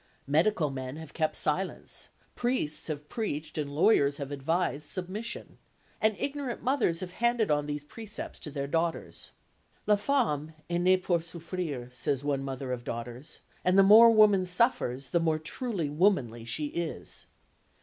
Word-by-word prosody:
Medical 155 +1 +2
men 130 0 -5
have 160 -1 -9
kept 155 -1 0
silence, 185 +5 -1 0.3
priests 240 - -1
have 150 -2 -5
preached 155 -9 -4
and 150 -2 -2
lawyers 145 -2 +3
have 140 -1 -5
advised 145 +1 -1
submission, 190 +5 -4 0.4
and 220 -2 +2
ignorant 280 -3 -3
mothers 245 -11 +1
have 180 -1 -5
handed 235 -1 +1
on 145 0 +1
these 145 0 -3
precepts 215 +7 -7
to - - -3
their 140 -1 -3
daughters. 165 +3 -2 0.6
"La 210 - +5
femme 200 - 0 0.2
est 175 0 +1
née 185 +1 +4
pour 175 -2 +2
souffrir," 165 -5 -5
says 130 +2 -1
one 140 -2 0
mother 135 -1 -4
of 125 -1 -3
daughters; 120 +5 -6 0.2
and 185 +1 +3
the 195 - +8
more 220 +4 +9
woman 215 -4 +6
suffers, 180 - +1
the 170 - +2
more 160 -2 +1
truly 180 - -3
womanly 145 - +1
she 140 +6 -2
is. 170 0 -4
160 Hz, 155 wpm, -29 LUFS, 145-200 Hz, 0.6 s, more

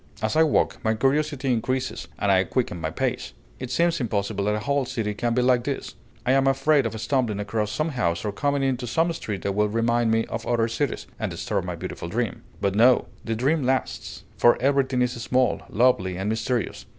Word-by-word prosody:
As 110 0 -1
I 160 - +5
walk, 160 -2 +2
my 110 0 +2
curiosity 140 +1 +1
increases 130 +3 -2
and 100 - +1
I 95 -1 +4
quicken 95 -5 -2
my 80 - -1
pace. 80 - -2 0.3
It 130 - -5
seems 170 0 +1
impossible 100 -3 -1
that 105 0 +1
a - - -1
whole 140 +4 +1
city 110 -4 -3
can 115 +2 -1
be 125 - +2
like 125 -1 +3
this; 140 +1 -4 0.3
I 125 - +3
am 135 0 +3
afraid 135 -1 +3
of 110 0 -6
stumbling 115 -3 0
across 105 +1 -2
some 155 +9 -1
house 85 - -1
or 105 - 0
coming 140 +6 0
into 130 -2 -1
some 165 +8 +1
street 105 - -5
that 100 - -1
will 105 +1 +1
remind 115 +1 +1
me 115 0 +2
of 115 +1 -5
other 115 -2 +2
cities, 135 +5 -2
and - - -1
disturb - - -2
my - - -4
beautiful - - -6
dream. 115 +2 -2 0.2
But 100 -1 0
no, 120 +5 +4
the 115 - -2
dream 140 +7 +1
lasts; 125 - -2
for 120 - +5
everything 135 -1 +2
is 125 - 0
small, 130 +1 +1
lovely, 100 -6 +2
and 95 +2 -2
mysterious. 110 -1 -2
120 Hz, 210 wpm, -24 LUFS, 105-135 Hz, 0.3 s, I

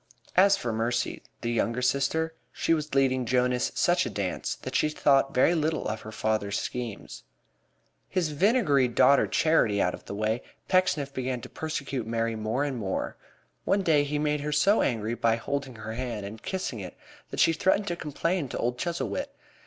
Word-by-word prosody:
As 195 +2 +6
for 115 -2 -3
Mercy, 115 +1 -1 0.2
the 120 - -1
younger 115 +1 0
sister, 140 +5 +1 0.2
she - - +1
was 150 -3 -2
leading 130 -2 +3
Jonas 125 +1 +1
such - - +3
a - - -3
dance - - -3
that - - -5
she 155 - +3
thought 135 -2 +3
very 130 +7 +4
little 160 -1 0
of 110 0 -3
her 110 - -9
father's 110 -2 -1
schemes. 120 -4 -5 0.9
His 170 -4 0
vinegary 150 - +3
daughter 135 +3 +4
Charity 135 -11 +2
out 90 - +2
of - - -10
the 100 - -6
way, 110 +3 0 0.3
Pecksniff 180 -7 +2
began 130 -1 -2
to - - -9
persecute 140 -6 -4
Mary 115 0 -1
more 110 +5 -1
and 140 -3 -2
more. 100 -4 -3 0.5
One 195 0 +1
day 155 -4 +4
he 145 +1 -2
made 150 0 0
her 150 +1 -3
so 195 +9 +4
angry 115 -2 0
by 115 -1 +2
holding 135 +2 -4
her 110 0 -6
hand 115 -4 -4
and 110 +2 -8
kissing 185 - -3
it 95 - -8 0.3
that - - -5
she 165 - +5
threatened 190 +5 +2
to 175 - -1
complain 165 +1 -2
to - - -4
old 125 +1 -1
Chuzzlewit. 175 - -2
135 Hz, 185 wpm, -27 LUFS, 115-155 Hz, 0.9 s, As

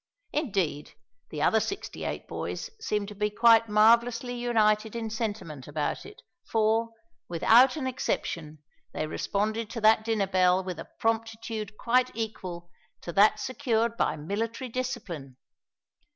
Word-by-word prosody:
Indeed 190 - -1 0.4
the 150 -1 -3
other 220 - +4
sixty 390 - -5
eight - - -4
boys - - -5
seemed 210 - -2
to - - -8
be 210 +1 -1 0.4
marvellously 235 +3 +4
united 220 -3 +1
in 225 -2 -3
sentiment 205 - -4
about 150 - -3
it, 415 - -15 0.2
for, 225 +1 +1 0.4
without 235 +9 +5
an 295 -4 -3
exception, 155 - -3 0.3
they - - -2
responded 210 +7 -2
to 230 0 -5
that 220 0 +5
dinner 220 -3 +1
bell 185 0 +3
with 180 -3 -5
a - - -8
promptitude 225 -1 -2
quite 250 +2 +2
equal 185 -6 -5 0.3
to 170 - -6
that 215 +3 +5
secured 235 -3 0
by - - +1
military 225 - -3
discipline! 170 - -5
220 Hz, 135 wpm, -28 LUFS, 185-230 Hz, 0.4 s, without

